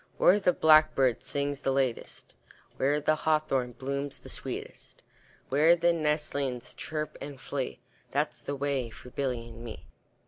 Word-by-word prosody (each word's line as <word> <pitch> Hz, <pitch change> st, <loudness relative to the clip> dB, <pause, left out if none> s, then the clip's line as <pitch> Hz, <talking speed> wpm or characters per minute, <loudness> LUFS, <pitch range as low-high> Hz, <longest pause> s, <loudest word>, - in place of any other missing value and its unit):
Where 200 Hz, +3 st, +6 dB
the 185 Hz, -3 st, +3 dB
blackbird 155 Hz, -6 st, +5 dB
sings 140 Hz, -1 st, -2 dB
the 135 Hz, -, 0 dB
latest, 135 Hz, -3 st, -2 dB, 0.4 s
Where 145 Hz, +2 st, +2 dB
the 155 Hz, +1 st, +2 dB
hawthorn 150 Hz, -6 st, +1 dB
blooms 140 Hz, +2 st, -3 dB
the -, -, -12 dB
sweetest, -, -, -7 dB, 0.5 s
Where 155 Hz, +5 st, +6 dB
the 170 Hz, 0 st, +3 dB
nestlings 145 Hz, -5 st, -1 dB
chirp 155 Hz, -1 st, -5 dB
and 140 Hz, -2 st, -7 dB
flee, 135 Hz, -1 st, -4 dB, 0.3 s
That's -, -, -1 dB
the 145 Hz, -, -3 dB
way 140 Hz, -3 st, -1 dB
for 125 Hz, +2 st, -12 dB
Billy 125 Hz, -4 st, -2 dB
and 115 Hz, 0 st, -11 dB
me. 115 Hz, -2 st, -8 dB
140 Hz, 145 wpm, -29 LUFS, 130-155 Hz, 0.5 s, Where